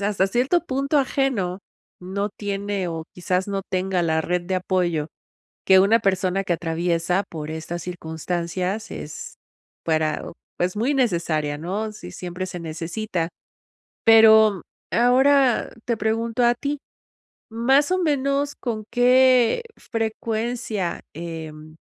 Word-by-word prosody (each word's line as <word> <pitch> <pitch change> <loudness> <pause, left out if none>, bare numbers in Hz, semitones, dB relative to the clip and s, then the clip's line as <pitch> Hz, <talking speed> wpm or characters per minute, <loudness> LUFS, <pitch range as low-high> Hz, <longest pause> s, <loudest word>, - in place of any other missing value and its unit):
hasta 200 -1 +1
cierto 255 - +2
punto 275 +1 0
ajeno, 255 -9 0 0.4
no 200 +3 -2
tiene 200 -2 -3
o 165 -1 -4
quizás 180 +1 -1
no 195 -1 -2
tenga 185 -1 0
la 160 -1 +1
red 175 +2 -1
de 185 +1 -1
apoyo 175 -4 0 0.6
que 190 -1 +7
una 205 +4 +5
persona 190 -1 +1
que 180 - 0
atraviesa 170 +2 0
por 155 -2 -6
estas 160 +2 -5
circunstancias 180 +4 -3
es 150 - -7 0.5
para 155 -1 0 0.3
pues, 180 +2 0
muy 240 +7 +1
necesaria, 170 - 0
¿no? 200 +7 -3
Sí, 90 - -10
siempre 180 - -5
se 180 - -6
necesita. 170 +2 -3 0.8
Pero, 220 -3 +7 0.3
ahora 260 +1 +4
te 235 -2 0
pregunto 225 +2 0
a 240 - +5
ti, 280 +5 -3 0.7
¿más 265 +8 +2
o 370 - +2
menos 285 -2 0
con 220 -4 -4
qué 255 - +4
frecuencia, 225 -3 -3
em, 155 -1 -8
195 Hz, 125 wpm, -23 LUFS, 175-235 Hz, 0.8 s, que